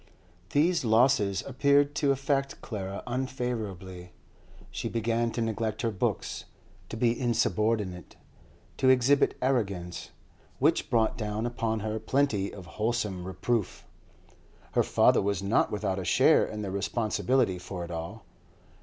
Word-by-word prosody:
These 165 - +2
losses 110 -4 +3
appeared 140 +2 +3
to 145 - +2
affect 135 0 -1
Clara 100 -3 -5
unfavourably. 110 -8 -4 0.6
She - - -4
began 115 +1 0
to 115 - -1
neglect 110 0 -2
her 115 - +1
books, 95 - -2 0.4
to - - -6
be 115 0 +3
insubordinate, 110 -5 0 0.6
to 130 - +3
exhibit 130 +2 +4
arrogance, 100 -10 -1 0.5
which - - +2
brought 115 -1 +1
down 105 +1 -2
upon 115 -2 -2
her 110 +1 -2
plenty 110 -4 0
of 95 -3 -10 0.2
wholesome 105 -5 -1
reproof. 100 +3 -2 0.9
Her - - +3
father - - +4
was 100 -1 -1
not 100 +3 +2
without 100 -2 -1
a - - -4
share - - +4
in 105 -1 -5
the 95 - -4
responsibility 110 +1 0
for 90 -1 -6
it 85 - -9
all. 85 +6 -6
110 Hz, 130 wpm, -28 LUFS, 100-125 Hz, 0.9 s, exhibit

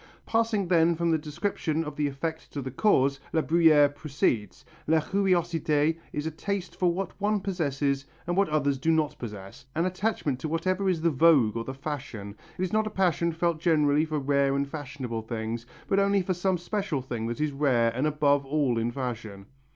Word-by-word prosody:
Passing 225 -4 +1
then 170 -1 +4
from 170 0 0
the 160 - +2
description 155 +1 -2
of 150 -2 -6
the 150 -1 0
effect 160 +4 -5
to 145 - -3
the 130 - -5
cause, 140 - +2
La 160 - +2
Bruyère 155 -3 +5
proceeds: 125 - -1 0.2
"La 160 +1 +4
curiosité 165 -4 +1
is 150 - -3
a 160 - -2
taste 195 +3 -4
for 180 -2 +2
what 185 +1 -3
one 210 +1 +2
possesses 145 -7 -1 0.2
and 175 0 -1
what 200 -1 +2
others 140 -3 +1
do 160 - 0
not 155 -2 +2
possess, 100 -5 -8
an 165 +2 +1
attachment 185 - -1
to 155 - -3
whatever 185 +5 0
is 170 -4 0
the 170 0 +3
vogue 135 -7 +4
or 115 0 -3
the 130 - -5
fashion; 130 -8 -6 0.2
it 185 - -1
is 185 - -2
not 215 0 +2
a - - -1
passion 175 -4 +1
felt 165 0 0
generally 150 -3 +3
for 155 -1 -2
rare 140 -1 +2
and 140 0 0
fashionable 140 -5 -5
things, 115 +1 -4 0.2
but 195 - +2
only 200 -1 +3
for 185 - 0
some 185 +1 0
special 175 -5 -2
thing 120 -3 -4
that 120 +3 -4
is 150 -1 0
rare 130 -5 +2
and 135 +5 +1
above 145 -2 +2
all 135 -4 +1
in 115 +1 0
fashion." 115 -6 -5
150 Hz, 195 wpm, -27 LUFS, 135-175 Hz, 0.2 s, Bruyère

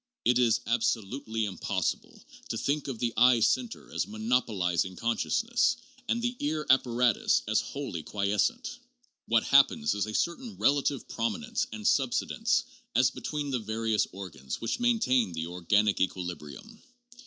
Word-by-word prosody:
It 125 0 +4
is 115 -2 +3
ab 120 0 +1
solutely 110 0 -1
impossible 95 -4 -3 0.3
to - - -2
think 145 +1 -1
of 130 -4 -4
the 115 0 -1
eye 125 -1 +6
center 230 - 0
as - - -1
monopolizing 105 -5 0
consciousness 115 - +1 0.3
and 235 - +1
the 245 +1 -1
ear 150 +1 -1
apparatus 125 -3 +2
as 110 0 +2
wholly 135 - -5
quiescent. 105 - -1 0.5
What 115 -1 +3
happens 135 - +4
is 105 +1 -1
a 110 - -5
certain 210 +5 -2
relative 140 -1 +1
prominence 225 - -2
and 215 -1 -3
subsidence 130 -3 +1 0.3
as 125 +1 +4
between 145 +1 -4
the 130 - 0
various 110 -1 0
organs 85 -9 -7
which 115 - -2
maintain 130 - +2
the 80 0 -3
organic 95 +5 +1
equilibrium. 90 - -4
115 Hz, 140 wpm, -29 LUFS, 100-140 Hz, 0.5 s, eye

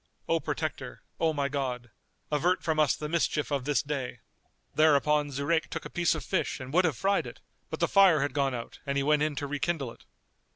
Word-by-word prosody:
O - - +2
Protector, - - -4 0.2
O 165 -1 +3
my 145 -2 -1
God, 125 -4 -3 0.4
avert 175 +5 +1
from 160 -1 0
us 150 -2 +4
the 150 - -5
mischief 155 -2 0
of 140 -3 -1
this 145 -1 +1
day!" 140 -4 -4 0.6
Thereupon 150 -1 +3
Zurayk 140 +4 0
took - - -6
a - - -7
piece 175 -1 +2
of - - -5
fish 185 -5 -1
and 130 +1 -8
would 180 +2 +4
have 155 -7 0
fried 195 +1 +1
it, - - -10 0.3
but - - -5
the - - +2
fire 190 -7 +5
had 140 -1 -1
gone 140 -3 +1
out 115 - -7
and 140 0 0
he 140 - +1
went 150 +1 +3
in 155 -1 0
to 145 - -3
rekindle 145 -2 -2
it. - - -17
145 Hz, 215 wpm, -29 LUFS, 140-160 Hz, 0.6 s, fire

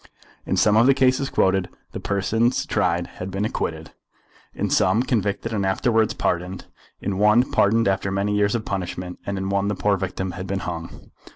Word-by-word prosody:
In - - 0
some 105 0 +4
of 115 +3 +5
the 135 - +5
cases 130 0 +2
quoted, 95 -1 +1 0.2
the - - -6
persons 110 +5 0
tried 85 +1 0
had 90 +2 -8
been 95 +2 -2
acquitted; 80 -6 -3 0.6
in - - -3
some, 115 - +3
convicted 110 -2 -1
and 100 -2 0
afterwards 110 +4 +1
pardoned; 90 +2 -2 0.4
in 95 -1 -2
one 105 +4 +4
pardoned 115 +2 +3
after 95 0 0
many 100 +2 0
years 105 +1 +2
of 115 - -3
punishment; 90 -1 -4
and 100 0 -2
in 95 0 -3
one 100 0 0
the 105 - -1
poor 100 +2 +1
victim 95 0 -3
had 95 +2 -7
been 95 +1 -2
hung. 85 -1 -7
100 Hz, 185 wpm, -23 LUFS, 95-110 Hz, 0.6 s, of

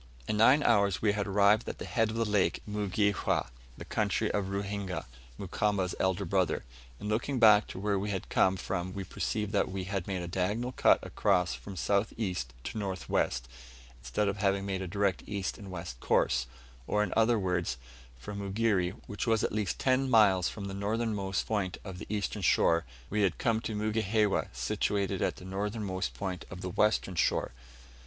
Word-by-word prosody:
In - - 0
nine 130 +7 +6
hours 100 -5 +3
we 105 - +4
had 100 -1 -2
arrived 100 +2 +4
at - - -6
the - - -6
head 115 -3 +1
of 110 - -4
the 115 0 +1
lake 105 -2 +1
in 105 - -7
Mugihewa, 100 -1 +1 0.3
the - - -8
country - - 0
of 100 -2 0
Ruhinga; 100 -1 -3 0.3
Mukamba's 100 -1 0
elder 95 +1 +1
brother. 90 0 +1 0.4
In - - -6
looking 120 +6 0
back 105 -3 +7
to - - -7
where 100 0 0
we 105 +2 -3
had 95 -3 -3
come 95 0 +3
from 90 0 -3
we 100 - -3
perceived 105 +3 -2
that 105 - +1
we 95 0 -4
had 95 -1 -3
made 95 -3 -2
a - - -4
diagonal 105 +8 -1
cut - - +5
across 90 0 +1
from 100 - -8
south 100 +3 +1
east 90 - -2
to 110 - -4
north 95 -3 -4
west, - - 0 0.5
instead 60 +13 -1
of 100 +1 -1
having 100 -1 +1
made 95 -1 -2
a 95 - -3
direct 100 0 0
east 100 0 -3
and 100 -2 -9
west 85 -9 -6
course; - - +2 0.4
or, 105 0 +2
in 105 - -3
other 115 +1 +4
words, 90 - -1 0.4
from 100 +12 -7
Mugere 100 -2 0
which 105 +3 -4
was 115 -1 +3
at - - 0
least 105 -3 -1
ten 130 0 +2
miles 100 -6 +5
from 100 -3 -7
the 100 - -5
northernmost 100 -2 -1
point 100 -4 -1
of 95 -3 -7
the - - -8
eastern 105 0 -2
shore 85 -1 +3 0.3
we 105 +1 +1
had 95 -4 +2
come 115 -1 +1
to 110 - -4
Mugihewa, 105 -1 +1
situated 100 -2 -1
at - - +1
the 90 - -12
northernmost 100 0 -3
point 95 -4 -4
of 95 -1 -8
the 90 - -3
western 105 0 +1
shore. 85 - +1
100 Hz, 190 wpm, -30 LUFS, 95-105 Hz, 0.5 s, back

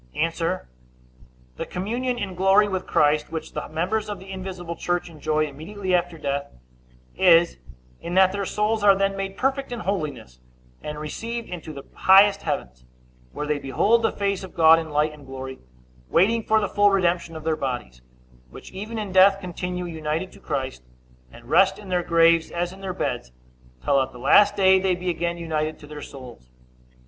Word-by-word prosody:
A. - - +1 1.3
The - - -4
communion 240 +7 -2
in 200 -5 -4
glory 195 +3 +4
with 190 -2 -3
Christ 150 +1 +2
which 160 -1 -6
the 150 - -5
members 190 +8 -2
of 205 - -4
the 190 +1 -11
invisible 185 -3 -6
church 175 +1 -2
enjoy 155 0 0
immediately 185 +7 -5
after 175 -1 0
death, 140 -1 -3 0.6
is, 170 - +4 0.4
in 175 - -5
that 190 0 +6
their 200 -1 -3
souls 210 0 0
are 200 -1 +7
then 195 0 0
made 195 0 -5
perfect 270 +2 -1
in 240 -2 -4
holiness, 155 - -4 0.4
and 150 0 -6
received 230 +10 -5
into 170 -3 -7
the 140 -2 -9
highest 200 +1 +5
heavens, 60 0 -4 0.5
where 150 - -4
they 150 -1 -1
behold 200 - +2
the 225 - +1
face 200 -1 -2
of 190 - -10
God 165 0 +7
in 160 -1 -6
light 150 +1 +1
and 150 -1 -14
glory, 130 0 -7 0.5
waiting 225 +6 +3
for 220 0 +2
the 205 - -1
full 205 +1 +3
redemption 175 -4 0
of 160 - -7
their 160 0 0
bodies, 120 - -5 0.5
which - - -12
even 210 +4 -6
in 210 -3 -4
death 195 +1 +6
continue 180 -1 -5
united 160 +2 -3
to - - -16
Christ, 135 - -4 0.5
and 120 - -15
rest 190 +9 +4
in 205 -2 -11
their 180 -1 +1
graves 165 -1 +3
as 175 +1 -3
in 195 - -13
their 190 -2 -4
beds, 60 0 -3 0.5
till 140 -1 +3
at 130 0 -4
the - - -11
last 205 +11 +5
day 190 -1 +5
they 185 -1 +1
be 180 0 -2
again 170 0 -2
united 155 -2 -2
to - - -13
their 150 0 -9
souls. 125 - -11
175 Hz, 185 wpm, -24 LUFS, 150-195 Hz, 1.3 s, are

